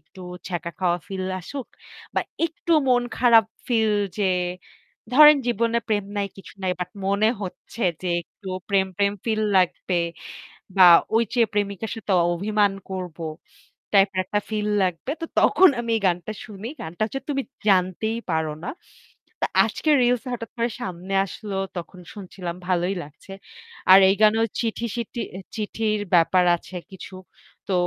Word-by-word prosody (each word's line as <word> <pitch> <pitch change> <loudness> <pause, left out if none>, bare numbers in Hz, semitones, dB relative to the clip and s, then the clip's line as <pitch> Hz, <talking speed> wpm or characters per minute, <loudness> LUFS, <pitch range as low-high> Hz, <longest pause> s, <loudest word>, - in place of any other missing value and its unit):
একটু 190 - -17 0.3
ছ্যাঁকা 170 -1 -4
খাওয়া 175 -2 +1
ফিল 190 -2 -4 0.2
আসুক 270 +8 -7 0.5
বা - - +2 0.3
একটু 335 +1 -3 0.2
মন 245 -1 +4 0.2
খারাপ 230 -2 +6 0.2
ফিল 220 -3 +2 0.3
যে 205 - +1 0.9
ধরেন 300 +1 +9
জীবনে 235 0 +1
প্রেম 205 -2 +1
নাই 200 - 0
কিছু 195 - -13
নাই। 185 - +1
বাট 180 0 -3 0.2
মনে 200 +2 +3
হচ্ছে 195 +4 -7 0.2
যে 185 - -2
একটু 190 +3 -13 0.2
প্রেম, 195 -1 +2
প্রেম 200 0 +2
ফিল 220 -2 0 0.2
লাগবে 180 0 0 0.8
বা 185 - +8 0.3
ওই 230 - +4
যেয়ে 235 -2 +3
প্রেমিকার 205 +1 -2
সাথে 210 -2 -3 0.2
অভিমান 205 +2 +1 0.2
করব 180 -3 -5 0.8
টাইপের 195 -1 +4
একটা 205 +3 0
ফিল 210 -1 -1 0.2
লাগবে। 180 +7 -2
তো - - -1
তখন 375 0 +6
আমি 235 - -4
এই 220 - -5
গানটা 180 +4 -1
শুনি। 210 0 -8
গানটা 165 +6 -8
হচ্ছে 270 +4 -5
'তুমি 275 -1 0 0.3
জানতেই 190 +4 +1
পারো 160 -1 0
না'। 260 - -4 0.7
তো - - +2 0.2
আজকে 310 - -3
রিলস 245 -1 +2
এ - - -3
হঠাৎ 230 -2 -6
করে 235 +1 +1
সামনে 185 -1 -5
আসলো 200 +1 -7 0.2
তখন 180 +2 -7
শুনছিলাম 185 -3 -7
ভালোই 180 +1 +1
লাগছে। 150 +6 -15 0.6
আর 190 - +11
এই 195 - +3
গানেও 220 +1 +5 0.2
চিঠি-সিটি 235 0 -3 0.2
এ - - -6 0.2
চিঠির 215 0 -1 0.2
ব্যাপার 180 +2 +4
আছে 175 +2 -12 0.2
কিছু। 190 0 -10 0.5
তো 195 - -1
200 Hz, 155 wpm, -23 LUFS, 185-225 Hz, 0.9 s, আর